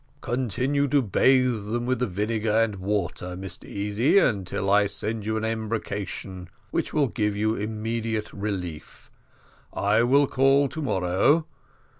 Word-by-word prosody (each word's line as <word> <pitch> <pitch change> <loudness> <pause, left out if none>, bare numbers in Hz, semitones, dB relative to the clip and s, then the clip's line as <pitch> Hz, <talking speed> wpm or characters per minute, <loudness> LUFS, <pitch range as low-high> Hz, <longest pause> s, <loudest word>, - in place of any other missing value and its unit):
"Continue 130 +4 0
to 140 0 +2
bathe 125 0 +3
them 120 +3 -2
with 130 +1 0
the 125 - 0
vinegar 105 +3 -1
and 115 -3 +1
water, 90 -2 -3
Mr 95 -2 -7
Easy, 105 - +1
until 100 - +1
I 105 0 +5
send 105 +1 -4
you 110 0 0
an 110 - -2
embrocation, 105 -4 -4 0.2
which - - -1
will 145 -3 +2
give 105 -3 -1
you 110 +1 +1
immediate 110 +1 -3
relief. 95 -6 -6 0.6
I 105 +3 +2
will 135 +4 +4
call 135 +2 +3
tomorrow. 120 - +1
110 Hz, 135 wpm, -25 LUFS, 100-125 Hz, 0.6 s, I